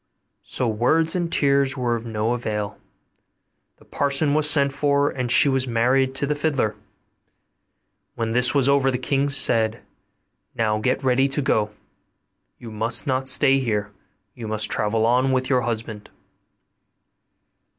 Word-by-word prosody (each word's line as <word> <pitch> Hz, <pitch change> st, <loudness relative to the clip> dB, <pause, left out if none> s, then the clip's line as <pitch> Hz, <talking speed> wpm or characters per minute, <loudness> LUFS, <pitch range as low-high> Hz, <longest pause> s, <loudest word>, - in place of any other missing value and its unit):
So 125 Hz, -, -4 dB
words 155 Hz, +10 st, 0 dB
and 175 Hz, -2 st, -2 dB
tears 140 Hz, -1 st, +1 dB
were 120 Hz, -2 st, -1 dB
of 115 Hz, 0 st, -7 dB
no 110 Hz, +1 st, -2 dB
avail; 105 Hz, -3 st, -4 dB, 1.0 s
the -, -, -22 dB
parson 145 Hz, +1 st, +1 dB
was 150 Hz, 0 st, +4 dB
sent 140 Hz, -2 st, +3 dB
for, 140 Hz, 0 st, 0 dB
and 125 Hz, -2 st, -3 dB
she 145 Hz, -, +6 dB
was 135 Hz, -1 st, 0 dB
married 130 Hz, +3 st, 0 dB
to 140 Hz, -, 0 dB
the 150 Hz, -, -1 dB
fiddler. 145 Hz, -7 st, -2 dB, 1.4 s
When 115 Hz, -1 st, -3 dB
this 125 Hz, +3 st, +1 dB
was 135 Hz, -2 st, +2 dB
over 140 Hz, -1 st, +2 dB
the 125 Hz, -, -1 dB
king 140 Hz, +2 st, -1 dB
said, 115 Hz, -5 st, +2 dB, 0.7 s
'Now 110 Hz, -2 st, -1 dB
get 120 Hz, +5 st, -2 dB
ready 130 Hz, +1 st, +2 dB
to 135 Hz, +2 st, -1 dB
go 105 Hz, -5 st, 0 dB, 0.9 s
you 115 Hz, -, -11 dB
must 110 Hz, +6 st, +2 dB
not 130 Hz, -2 st, -2 dB
stay 135 Hz, +1 st, +4 dB
here 105 Hz, -5 st, -3 dB, 0.4 s
you 115 Hz, -2 st, -9 dB
must 110 Hz, -1 st, -1 dB
travel 110 Hz, +1 st, 0 dB
on 125 Hz, +3 st, +1 dB
with 130 Hz, +1 st, -1 dB
your 130 Hz, -1 st, +2 dB
husband. 110 Hz, -3 st, -6 dB
130 Hz, 150 wpm, -22 LUFS, 115-140 Hz, 1.4 s, she